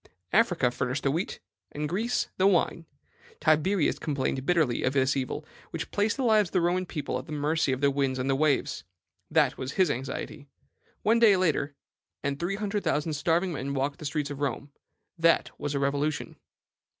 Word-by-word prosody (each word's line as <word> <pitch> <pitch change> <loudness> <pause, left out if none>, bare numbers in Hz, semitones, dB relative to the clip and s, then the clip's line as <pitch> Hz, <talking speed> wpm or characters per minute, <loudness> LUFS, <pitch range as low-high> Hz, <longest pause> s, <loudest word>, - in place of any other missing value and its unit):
Africa 175 - +3
furnished 125 +2 -2
the 140 - +2
wheat, 165 +6 -2 0.3
and 150 +1 -3
Greece 220 +9 -1
the 190 - +4
wine. 170 -3 +1 0.5
Tiberius 155 +3 +2
complained 135 -3 -2
bitterly 160 -9 +2
of 130 - +1
this 135 0 +2
evil, 130 -2 -3 0.2
which - - -5
placed 205 +4 +1
the 270 - -1
lives 215 -5 +4
of - - -27
the 185 - +3
Roman 180 +2 +1
people 150 -6 -3
at 130 - -11
the - - -9
mercy 150 0 +1
of 130 +1 -2
the 140 -1 +4
winds 135 -1 0
and 135 +1 0
waves: 150 - +1 0.5
that - - +2
was 130 +1 -4
his 185 -5 +3
anxiety. 135 +3 -5 0.6
One 225 +2 +4
day 215 -4 +6
later, 150 -5 0 0.5
and 140 0 -2
three 180 +3 -1
hundred 205 0 -2
thousand 150 +2 0
starving 165 +5 +1
men 140 -1 -3
walked 140 +2 -1
the 155 - -8
streets 145 0 -2
of 145 - -6
Rome: 140 0 -3 0.5
that 165 0 +3
was 145 0 -3
a - - +1
revolution. 140 +2 -1
150 Hz, 185 wpm, -28 LUFS, 140-180 Hz, 0.6 s, day